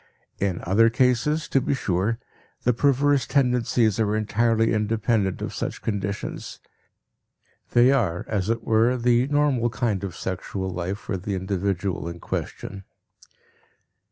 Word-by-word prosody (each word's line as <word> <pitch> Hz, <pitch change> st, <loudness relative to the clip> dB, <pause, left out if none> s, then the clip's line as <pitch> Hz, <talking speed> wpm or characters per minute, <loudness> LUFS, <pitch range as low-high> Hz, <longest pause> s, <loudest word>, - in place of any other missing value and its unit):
In 95 Hz, -3 st, -1 dB
other 110 Hz, +6 st, +4 dB
cases, 125 Hz, +6 st, +1 dB
to 135 Hz, -, +2 dB
be 140 Hz, -, 0 dB
sure, 100 Hz, -1 st, 0 dB, 0.5 s
the 125 Hz, -, +3 dB
perverse 140 Hz, +2 st, +2 dB
tendencies 125 Hz, -5 st, +2 dB
are 105 Hz, -1 st, +1 dB
entirely 115 Hz, +1 st, +2 dB
independent 110 Hz, -2 st, 0 dB
of -, -, -4 dB
such -, -, -4 dB
conditions; 100 Hz, -2 st, -4 dB, 1.1 s
they 120 Hz, +2 st, +6 dB
are, 100 Hz, -11 st, 0 dB
as 105 Hz, -2 st, -1 dB
it 115 Hz, 0 st, -1 dB
were, 115 Hz, +3 st, +3 dB
the 120 Hz, +1 st, +3 dB
normal 145 Hz, -5 st, +2 dB
kind 110 Hz, -5 st, -1 dB
of 95 Hz, -4 st, -5 dB
sexual 95 Hz, +1 st, -4 dB
life 90 Hz, +2 st, -3 dB
for 100 Hz, -2 st, -4 dB
the 95 Hz, +2 st, -3 dB
individual 95 Hz, -1 st, -2 dB
in 85 Hz, 0 st, -8 dB
question. 95 Hz, +3 st, -5 dB
110 Hz, 130 wpm, -24 LUFS, 95-125 Hz, 1.1 s, they